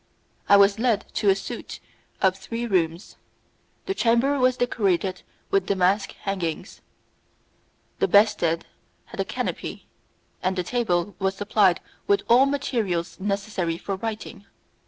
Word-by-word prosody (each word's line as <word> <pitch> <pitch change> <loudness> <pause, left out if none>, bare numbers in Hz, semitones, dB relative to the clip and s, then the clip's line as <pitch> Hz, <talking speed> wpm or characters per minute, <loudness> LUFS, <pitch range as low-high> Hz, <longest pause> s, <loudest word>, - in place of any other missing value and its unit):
I 200 - +8
was 200 +1 +5
led 230 -3 +1
to 205 - +2
a 190 - +5
suite 195 - -7 0.4
of 190 -1 +4
three 230 +5 -5
rooms; 175 -4 -1 0.7
the 390 - -1
chamber 260 0 +2
was 255 0 +3
decorated 195 -6 0 0.3
with 395 0 +2
damask 195 +1 +1
hangings, 180 -5 -4 1.2
the - - +3
bedstead 200 -6 +3 0.4
had - - -12
a - - +2
canopy, - - -4 0.6
and 185 +1 0
the 180 - -1
table 200 -3 -1
was 195 -1 0
supplied 205 -2 +2 0.3
with 200 - +3
all 250 +4 +6
materials 205 -12 -2
necessary 195 -4 -2
for 195 +3 -4
writing. 215 0 -6
200 Hz, 130 wpm, -24 LUFS, 185-230 Hz, 1.2 s, I